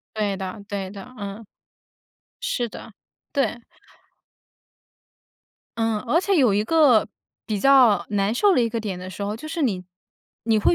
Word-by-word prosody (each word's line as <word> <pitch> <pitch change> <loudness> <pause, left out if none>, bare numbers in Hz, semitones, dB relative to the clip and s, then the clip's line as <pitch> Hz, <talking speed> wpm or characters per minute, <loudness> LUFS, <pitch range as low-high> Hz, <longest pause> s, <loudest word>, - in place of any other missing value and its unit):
对 205 -2 -1
的 195 +2 -6
对 195 -2 -4
的， 200 0 -9
嗯。 205 +1 -7 0.9
是 275 - -2
的， 220 - -11 0.4
对。 275 -4 0 2.2
嗯， 225 -1 +1
而 275 +10 +1
且 395 0 +1
有 250 -9 +4
一 205 +1 +2
个 285 -5 +4 0.4
比 210 -2 -1
较 245 -8 +5
难 205 +2 +1
受 400 +8 +4
的 255 - +3
一 230 - +1
个 230 0 -3
点 195 -4 -4
的 185 0 -7
时 200 - -7
候， 205 +1 -2
就 275 - -9
是 325 0 -3
你 190 -8 0 0.6
你 225 -2 +3
会 275 - +3
220 Hz, 170 characters per minute, -23 LUFS, 200-265 Hz, 2.2 s, 较